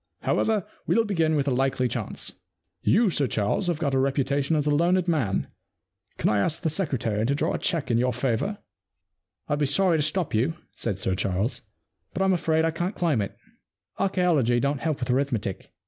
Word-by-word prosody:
However, 215 -4 +1 0.2
we'll 230 - +3
begin 165 -7 +1
with 145 -1 0
a - - +2
likely 130 0 +1
chance. - - -4 0.5
You, 220 -2 +3
Sir 145 -4 +1
Charles, 110 - 0
have 175 -3 +1
got 145 -4 -1
a 135 - +3
reputation 140 +2 +1
as 150 -1 +1
a 150 - +2
learned 175 +4 +2
man; 140 - +1 0.7
can - - 0
I 105 - +2
ask 150 +10 -1
the 160 - +1
secretary 130 - -1
to 135 +5 +1
draw - - 0
a - - -2
cheque 165 -8 -1
in 115 - +3
your 125 +1 +2
favour? 125 - -1 0.3
' - - -58
* - - -57
I'd 145 -1 0
be 145 - +2
sorry 175 +3 +3
to - - +2
stop 155 +3 -1
you,' 125 +10 +1 0.2
said 95 - -3
Sir 95 -1 0
Charles, 95 +5 -1 0.3
* 95 -4 -48
but 190 - 0
I'm 190 0 +3
afraid 160 -2 +2
I 165 - +1
can't 175 +5 -3
claim 160 - +1
it. 100 - -5 0.6
Archaeology 175 -11 +2
don't 140 +2 0
help 155 -4 -1
with 125 - -1
arithmetic. 125 -7 -1
145 Hz, 205 wpm, -26 LUFS, 125-170 Hz, 0.7 s, we'll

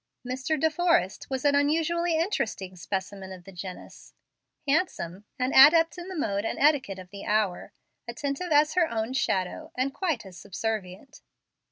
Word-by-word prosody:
Mr. 265 +5 -1
De 320 +2 +2
Forrest 310 - +1
was 265 +1 -3
an 285 - +5
unusually 325 +4 +2
interesting 220 - -2
specimen 190 +2 -5
of 185 -1 -10
the 195 - -12
genus, 185 0 -10 0.5
handsome, 215 - -1
an 255 +1 -1
adept 325 +5 +7
in 355 0 -8
the 380 - -6
mode 200 -8 -1
and - - -2
etiquette 280 -10 +2
of 185 0 -11
the 200 0 -8
hour, 210 -4 0 0.4
attentive 280 +7 -3
as 300 +1 +4
her 345 -1 +3
own 225 +2 -2
shadow, 190 -9 -1
and 265 +2 0
quite 320 - -2
as 185 -2 -11
subservient. 205 +4 -5
255 Hz, 160 wpm, -27 LUFS, 195-315 Hz, 0.5 s, adept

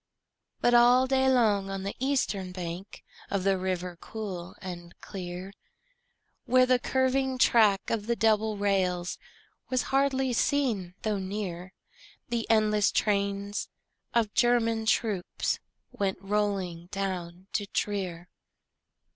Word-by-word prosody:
But 240 - +3
all 245 +2 +6
day 265 0 +3
long 210 -6 +3
on 195 -1 -4
the 200 - -4
eastern 240 -8 0
bank 180 +1 -7 0.3
Of 200 -2 -1
the 195 0 +3
river 180 -1 -3
cool 190 -5 -6
and 175 -3 -8
clear, 185 0 -7 0.9
Where 255 0 +5
the 255 0 +3
curving 260 +1 +1
track 215 -5 +4
of 220 -2 -1
the 235 - +1
double 220 0 +2
rails 185 -3 0 0.5
Was 255 -1 +1
hardly 270 -2 +2
seen 225 -10 0
though 215 -2 0
near, 190 -2 -5 0.6
The 235 -1 -2
endless 215 -2 +3
trains 200 0 0 0.5
of 225 -3 +2
German 230 -2 +2
troops 210 -6 0 0.3
Went 195 -1 -1
rolling 195 -4 -1
down 185 -2 -4
to 205 - -1
Trier. 185 -5 -3
205 Hz, 120 wpm, -28 LUFS, 185-235 Hz, 0.9 s, all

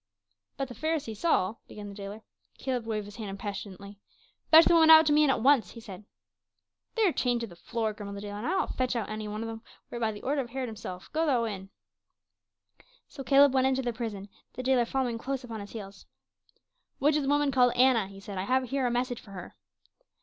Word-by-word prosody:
"But 275 - -2
the 245 - -9
Pharisee 295 -3 -2
Saul 215 - 0
" - - -47
began 210 -1 -9
the - - -9
jailer. 200 +2 -8 0.3
Caleb 250 -4 -3
waved 215 -2 -2
his 205 0 -11
hand 215 -3 -5
impatiently. 200 0 -7 0.5
"Fetch 320 +1 +9
the - - +4
woman 325 -1 +6
out 320 0 +10
to 295 - +3
me 300 - +5
and 300 - +4
at 245 -4 +1
once," 265 -8 +4
he 230 - -10
said. 205 -3 -10 0.9
"They 450 -2 +3
are - - +3
chained 245 -2 0
to - - -2
the 180 -6 -13
floor," 220 +4 -3
grumbled 200 -1 -7
the - - -7
jailer, 205 0 -6
"and 230 - -4
I - - 0
will 380 - +2
not - - -4
fetch 255 -1 -1
out 230 -4 -2
any 215 0 -4
one 210 +1 -4
of - - -4
them, 225 0 -7 0.3
were - - -5
it - - -6
by 220 -1 +1
the 210 - -10
order 280 +2 0
of 240 - -7
Herod 255 0 -4
himself. 185 -4 -8
Go 320 +1 +1
thou 250 -5 +2
in." 195 -4 -5 1.4
So 270 - -9
Caleb 275 +2 +5
went 260 0 +3
into 265 0 0
the 240 -1 -2
prison, 215 -4 -5 0.3
the 255 - -6
jailer 255 -2 +3
following 245 -2 -2
close 270 +2 -4
upon 230 -3 -7
his 205 0 -9
heels. 200 -3 -9 0.9
"Which 295 +2 +2
is 300 - +2
the 275 - -2
woman 290 -1 +2
called 250 -2 +4
Anna?" 245 -5 +4
he 195 0 -12
said. 195 -1 -7
"I 185 - -2
have 255 +2 0
here 270 -2 +1
a - - +1
message 245 0 -2
for - - -17
her." 180 -2 -9
235 Hz, 245 wpm, -28 LUFS, 205-265 Hz, 1.4 s, out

